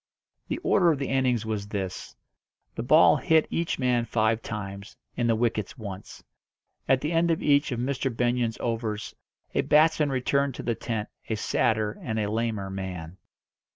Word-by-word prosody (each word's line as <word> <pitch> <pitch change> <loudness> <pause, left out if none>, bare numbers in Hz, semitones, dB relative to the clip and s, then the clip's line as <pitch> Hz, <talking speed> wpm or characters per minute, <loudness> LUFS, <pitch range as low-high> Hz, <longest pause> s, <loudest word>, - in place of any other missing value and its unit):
The - - -2
order 175 -4 +4
of 150 - 0
the 135 - -3
innings 130 -4 +1
was 105 -2 -3
this: 95 -3 -5 0.6
the - - -4
ball 155 +7 +6
hit 160 -1 +3
each 170 0 -1
man 125 -2 +1
five 110 -1 +1
times, 100 -2 -7 0.2
and 120 -1 0
the 115 - +4
wickets 110 0 -1
once. 100 -3 -8 0.7
At 130 -1 +4
the 150 - -2
end 170 0 +2
of 165 - 0
each 145 0 +3
of 120 - -2
Mr. 135 +1 -1
Benyon's 120 -1 0
overs 115 -3 -3 0.4
a - - +2
batsman 155 -1 +4
returned 135 +1 0
to - - -6
the 120 - 0
tent 110 -2 -3 0.2
a 110 - 0
sadder 110 0 0
and 110 - -3
a 105 -1 -1
lamer 110 -3 -2
man. 95 -3 -6
115 Hz, 170 wpm, -26 LUFS, 105-135 Hz, 0.7 s, ball